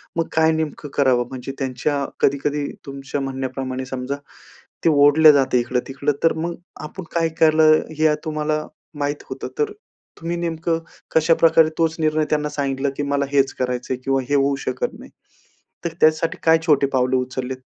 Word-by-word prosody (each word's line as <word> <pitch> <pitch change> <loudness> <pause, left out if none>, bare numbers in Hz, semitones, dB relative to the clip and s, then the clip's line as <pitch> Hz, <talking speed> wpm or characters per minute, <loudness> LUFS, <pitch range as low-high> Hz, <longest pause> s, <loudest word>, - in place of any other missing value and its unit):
मग 165 -1 0
काय 160 0 +4
नेमकं 155 -2 -3
करावं 130 -4 +2
म्हणजे 130 0 -6
त्यांच्या 140 +2 -1
कधी-कधी 145 +1 +1 0.2
तुमच्या 140 +1 -5
म्हणण्याप्रमाणे 130 -1 -4
समजा, 130 +1 -4 0.7
ते 165 - +5
ओढले 150 +1 +7
जाते 135 -3 +3
इकडं-तिकडं 130 +4 -1
तर 165 - +4
मग 170 0 -3 0.3
आपण 185 +4 -9
काय 165 -1 +2
केले, 155 0 +6 0.3
हे 155 -1 +4
तुम्हाला 155 0 -1 0.3
माहीत 145 0 -2
होतं. 130 0 -5
तर 440 -1 +1 0.5
तुम्ही 170 +1 -3
नेमकं 165 -1 -1 0.3
कशाप्रकारे 160 0 +4
तोच 165 -1 +1
निर्णय 155 -1 +1
त्यांना 150 0 0
सांगितलं 140 -1 -1
की 145 - -1
मला 140 0 0
हेच 140 -1 +2
करायचंय 125 0 -2
किंवा 135 0 +1
हे 145 - +2
होऊ 140 0 +2
शकत 485 - -2
नाही. - - -13 0.7
तर 170 - -2
त्यासाठी 155 +1 +3
काय 160 0 +6
छोटे 145 -4 +4
पावले 130 0 +2
उचललेत? 130 0 -3
145 Hz, 155 wpm, -21 LUFS, 135-160 Hz, 0.7 s, ओढले